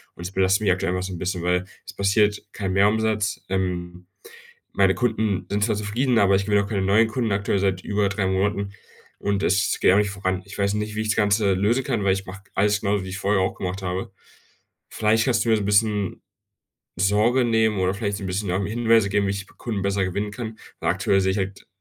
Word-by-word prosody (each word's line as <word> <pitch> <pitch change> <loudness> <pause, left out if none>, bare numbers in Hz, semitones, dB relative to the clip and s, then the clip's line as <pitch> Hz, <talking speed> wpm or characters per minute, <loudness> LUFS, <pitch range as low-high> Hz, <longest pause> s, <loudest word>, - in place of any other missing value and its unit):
und 85 - -9
es 90 - -5
belastet 95 +1 +2
mich 100 - +3
aktuell 90 -1 -2
immer 90 - -1
so 95 - -5
'n - - -5
bisschen, 90 -1 -2
weil 90 +1 +1 0.2
es - - -9
passiert 105 +1 +2
kein 95 -3 -3
Mehrumsatz. 105 +1 +1
Ähm, 90 -1 -3 0.7
meine - - +3
Kunden 110 -5 0
sind 100 0 0
zwar 110 - 0
zufrieden, 115 +5 0
aber 100 -1 +4
ich 100 0 0
gewinne 105 -1 +2
auch 100 - -7
keine 100 -3 -1
neuen 100 +4 +4
Kunden, 115 0 -1
aktuell 100 0 0
seit 95 -2 0
über 105 -1 0
3 100 0 -1
Monaten 100 +1 0 0.5
und 100 -1 -1
es 100 +1 +1
geht - - +5
auch 100 - +4
nicht 105 -1 +1
voran. 95 -2 -2
Ich 100 - -10
weiß 100 0 +1
nicht, 105 0 -3
wie 110 - -1
ich 110 - -3
das 110 - +2
Ganze 105 -1 +3
lösen 110 +8 +1
kann, 120 -6 -1
weil 95 - +4
ich 95 0 -4
mache 95 +1 -9
alles 105 +1 +2
genauso, 100 -1 0
wie 95 - -7
ich 95 - -5
es 100 - -7
vorher 100 -1 +2
auch 95 - -1
gemacht 95 +1 -4
habe. 95 +1 -4 0.8
Vielleicht 110 +1 +2
kannst 125 -3 +1
du - - -3
mir 110 - +5
so 105 - -2
'n - - -4
bisschen 105 -1 +1 0.7
Sorge 105 +7 +3
nehmen 110 -3 +2
oder 95 0 +1
vielleicht 100 0 -2
so - - -9
'n - - -3
bisschen, 95 +2 -2
ähm, 95 +2 0
Hinweise 115 -1 +2
geben, 100 0 +1
wie - - 0
ich 100 0 -4
Kunden 110 -5 -3
besser 100 0 0
gewinnen 100 +3 -2
kann, 110 0 -7 0.2
weil - - +1
aktuell 95 - +2
sehe 95 0 +1
ich 100 - -2
halt 95 0 -4
100 Hz, 240 wpm, -23 LUFS, 95-105 Hz, 0.8 s, geht